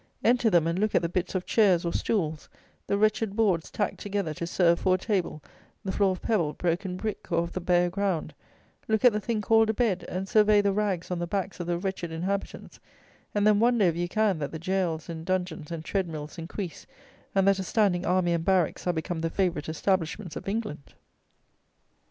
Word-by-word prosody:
Enter 240 -1 +4
them, 175 -5 +4
and 170 +2 0
look 215 +1 +1
at - - +3
the 170 - 0
bits 185 +2 -2
of 180 - -1
chairs 190 -6 +3
or 170 - -1
stools; 160 -8 -1 0.4
the 200 - +1
wretched 215 0 +1
boards 195 -8 +1
tacked 205 - -2
together 200 -6 -2
to 170 +2 -5
serve 170 -1 +3
for 185 -1 +3
a - - 0
table; 185 -7 -2 0.4
the 190 - -1
floor 200 0 +2
of 185 - -9
pebble, 170 -10 +1
broken 180 +2 -2
brick, 215 -2 -5
or 170 0 +2
of 170 - -7
the 185 - -3
bare 175 0 +3
ground; 185 -4 -2 0.5
look 220 +1 +1
at 245 - +7
the 210 - 0
thing 215 +1 -2
called 225 +1 +4
a 220 - +1
bed; 215 -7 +1
and 190 +2 -3
survey 210 0 +5
the 200 -1 +2
rags 195 -4 -1
on 180 - -1
the 175 - -2
backs 190 +1 -3
of 175 - -4
the 175 -1 0
wretched 180 -2 -4
inhabitants; 190 +5 -4 0.6
and 205 0 +2
then 210 -1 +5
wonder, 235 -2 +4
if 170 -2 +2
you 175 +1 -1
can, 210 -4 +1
that 145 - -3
the 160 - -5
jails 170 -2 -1
and 165 -2 -6
dungeons 180 -4 -2
and 165 -2 -6
tread 190 0 -1
mills 155 0 -7
increase, 170 +1 -6 0.5
and 195 0 +3
that 195 -1 +4
a - - -1
standing 185 -2 +1
army 180 -1 +2
and 165 -1 -1
barracks 185 -2 +1
are 180 - +2
become 160 0 -3
the 165 - 0
favourite 180 -3 -1
establishments 175 +2 -1
of - - -7
England! 205 -9 -4
185 Hz, 215 wpm, -27 LUFS, 170-205 Hz, 0.6 s, at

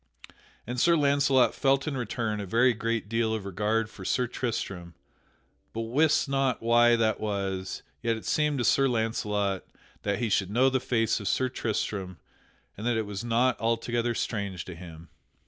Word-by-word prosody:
And 125 +2 -4
Sir 170 +6 +5
Launcelot 140 -3 +3
felt 135 +1 +1
in 150 - -2
return 115 -3 -2
a 100 - -4
very 120 +5 +4
great 115 -1 -2
deal 115 0 0
of 105 -3 -5
regard 105 +3 0
for 105 -3 -12
Sir 125 +6 +1
Tristram, 95 -8 -4 0.8
but 115 - -3
wist 145 +8 +2
not 135 -2 +1
why 120 +1 +5
that 110 -2 +1
was; 95 -3 -3 0.2
yet 115 -1 0
it 110 - -10
seemed 150 -2 +1
to 120 - 0
Sir 135 +3 +4
Launcelot 105 -5 -1 0.4
that 100 -1 -1
he 120 - -1
should 95 -2 +1
know 130 +5 +3
the 130 - +1
face 115 -3 0
of 100 - -5
Sir 130 +5 +1
Tristram, 100 -6 -3 0.6
and 110 +4 -5
that 120 -2 +2
it 110 - -1
was 100 +1 -5
not 120 +2 +1
altogether 115 +1 0
strange 100 -6 -3
to 90 - -7
him. 85 -1 -11
115 Hz, 175 wpm, -28 LUFS, 100-125 Hz, 0.8 s, Sir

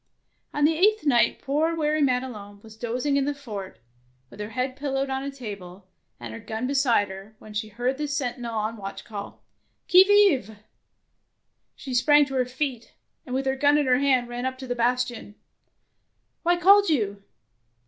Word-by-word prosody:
On 295 0 +1
the 320 +1 +3
eighth 420 +4 +3
night 245 -5 +3
poor 310 +4 0
weary 305 -1 0
Madelon 250 -7 -2
was 220 -1 -13
dozing 250 +5 -1
in 275 - +1
the 290 0 -2
fort, 210 -9 -8 0.5
with - - -14
her 210 0 -5
head 255 +3 -3
pillowed 270 -1 -2
on 265 0 -2
a 280 - -4
table, 200 -8 -9 0.3
and 120 -2 -8
her 110 - -7
gun 220 +3 -4
beside 255 -7 +2
her, 195 +3 -10
when 215 0 -13
she 215 +1 -3
heard 245 +6 -2
the 300 - -1
sentinel 245 -5 -3
on 215 +1 -2
watch 195 -1 -7
call, 205 -2 -8
— - - -46
" - - -49
Qui 365 +1 +9
vive? 385 - +3 0.6
" - - -51
She 265 - -7
sprang 290 +4 +5
to 270 - -8
her 255 -1 +1
feet, 255 -2 -4 0.3
and 250 - -3
with 270 +1 -1
her 265 0 +1
gun 285 +2 +3
in 295 - +2
her 250 -1 +3
hand 260 -3 +2
ran 240 +1 -5
up 260 0 -2
on - - -24
to 260 - -7
the 245 - -1
bastion. 245 -3 -1 1.1
Why 350 +1 +2
called 395 +2 +6
you 205 -9 0
255 Hz, 195 wpm, -25 LUFS, 220-285 Hz, 1.1 s, Qui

